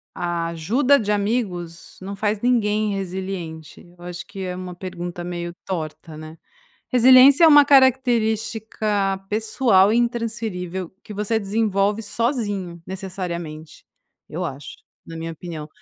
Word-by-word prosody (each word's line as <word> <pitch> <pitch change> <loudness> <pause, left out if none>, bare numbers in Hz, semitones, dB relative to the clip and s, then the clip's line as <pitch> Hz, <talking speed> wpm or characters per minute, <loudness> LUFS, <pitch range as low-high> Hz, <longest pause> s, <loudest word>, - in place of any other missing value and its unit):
a 170 -1 -2
ajuda 230 - +2
de 210 -1 -1
amigos 200 -6 -2
não 200 +1 -6
faz 210 0 -1
ninguém 215 -4 +1
resiliente, 185 -4 -6 0.2
eu 175 - -15
acho 175 0 -7
que 195 - -10
é 180 -1 -4
uma 180 -1 -7
pergunta 175 -1 -6
meio 175 -1 -5
torta, 160 -3 -5
né. 155 +1 -10 0.5
Resiliência 260 +5 +7
é - - +9
uma 290 -1 +8
característica 220 -6 +2
pessoal, 215 -2 +3
intransferível, 220 -7 -2
que 210 - -9
você 210 +2 0
desenvolve 205 0 0
sozinho, 205 - -2
necessariamente, 175 -5 -6 0.4
eu 180 +4 -4
acho, 140 -3 -7 0.3
na 165 - -8
minha 165 0 -5
opinião. 160 -2 -8
195 Hz, 125 wpm, -22 LUFS, 175-225 Hz, 0.5 s, é